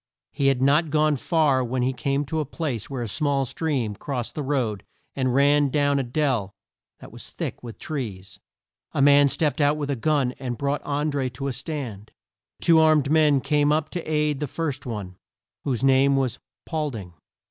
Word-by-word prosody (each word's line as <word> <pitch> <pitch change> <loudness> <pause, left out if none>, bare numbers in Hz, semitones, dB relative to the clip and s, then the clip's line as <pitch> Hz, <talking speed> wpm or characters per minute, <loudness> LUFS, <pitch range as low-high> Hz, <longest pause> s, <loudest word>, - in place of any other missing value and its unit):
He 140 - 0
had 135 -2 +2
not 150 +4 +3
gone 155 0 +2
far 140 -2 +2
when 125 +1 -1
he 130 +1 +1
came 140 +2 -1
to 160 +3 -2
a - - +1
place 140 - -4
where 130 -3 -3
a - - -4
small 140 +4 +1
stream 130 -6 -2
crossed 125 0 -4
the 150 - -4
road 130 -8 -1 0.3
and 130 -2 0
ran 145 +1 +4
down 145 0 +2
a - - 0
dell 120 -6 -1 0.4
that - - -12
was - - -10
thick - - -5
with 120 -2 -9
trees. 100 - -6 0.5
A - - 0
man 145 0 +6
stepped 150 0 0
out 145 +1 +3
with 145 -1 -2
a - - 0
gun 140 0 +1
and 125 -3 -4
brought 140 +1 -1
An 150 +1 -1
dré 135 -3 -1
to 135 - -6
a 135 - -1
stand. 125 -7 -6 0.5
Two 165 -2 +4
more 160 - +6
armed 150 -3 +3
men 150 -3 +4
came 150 0 +2
up 155 0 0
to 175 - -3
aid 150 -2 +1
the 150 - -2
first 145 -2 -4
one, 100 -6 -6 0.5
whose 130 -3 -1
name 135 +1 +4
was 135 -3 -1 0.3
Paul 155 -3 -2
ding. 100 -9 -8
140 Hz, 200 wpm, -24 LUFS, 125-150 Hz, 0.5 s, man